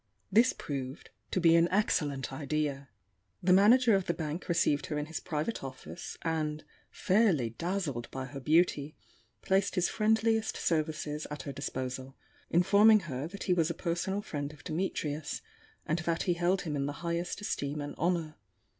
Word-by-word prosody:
This 230 +6 +5
proved 135 -1 -6 0.2
to - - 0
be 165 -2 +6
an 170 0 +5
excellent 150 -9 0
idea. 140 -1 -2 0.5
The 180 +1 +5
manager 225 +5 +6
of 195 -2 +2
the 170 - 0
bank 160 +3 -4
received 150 -4 +2
her 150 - -2
in 150 - -2
his 160 +1 -5
private 155 +4 -3
office, 135 +5 -8
and, 155 -2 -1 0.3
fairly 185 - +2
dazzled 165 - -3
by 130 0 -5
her 135 +1 -7
beauty, 155 0 +2 0.5
placed 190 0 +1
his 180 -1 +2
friendliest 220 0 +1
services 155 -1 -1
at 150 0 -6
her 140 - -5
disposal, 130 -1 -5 0.3
informing 205 +5 +6
her 140 -3 -4
that 200 +4 -7
he 185 - +2
was 165 -2 +2
a 170 - -3
personal 190 +3 -2
friend 145 -7 -4
of 150 - -16
Dimitrius, 155 -3 -3 0.4
and 160 +3 0
that 165 +1 -1
he 180 - +2
held 175 +2 +1
him 155 -3 -3
in 140 0 -1
the 145 - -3
highest 170 +2 -2
esteem 145 -7 -3
and 145 0 -4
honour. 165 -2 -1
160 Hz, 165 wpm, -31 LUFS, 145-185 Hz, 0.5 s, be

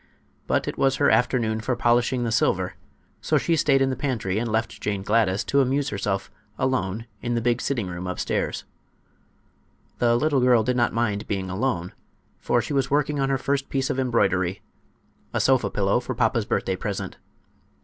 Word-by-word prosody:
But - - +1
it - - -4
was 135 -1 +3
her 145 - +3
afternoon 115 -3 +1
for 125 +3 -1
polishing 120 +1 +2
the 115 - -1
silver, - - +1 0.5
so - - +2
she 170 - +1
stayed 140 -4 +3
in 135 - +1
the - - -2
pantry 110 -9 -1
and 115 -1 -2
left 110 +1 -2
Jane 100 -2 -2
Gladys 105 -2 +2
to 140 - +2
amuse 135 +2 0
herself 100 -2 -2 0.3
alone 115 -5 -1 0.2
in 120 -1 -1
the - - +1
big 120 +1 0
sitting 120 -7 -1
room 90 0 -5
upstairs. 90 - -2 1.4
The 120 -1 +3
little 140 +1 +2
girl 125 -3 +4
did 125 +3 0
not 120 -2 +2
mind 110 -3 -1
being 95 -2 -3
alone, 95 -4 -2 0.5
for 120 -1 +1
she - - -4
was 135 -1 +1
working 145 0 +1
on 135 0 +1
her 135 - +2
first 140 +1 -1
piece 135 -1 0
of 135 - -2
embroidery—a 95 -7 -2
sofa 130 -2 +3
pillow 100 +3 +1
for 125 0 -5
papa's 115 -2 +1
birthday 95 - 0
present. 100 +1 -4
120 Hz, 180 wpm, -24 LUFS, 105-135 Hz, 1.4 s, girl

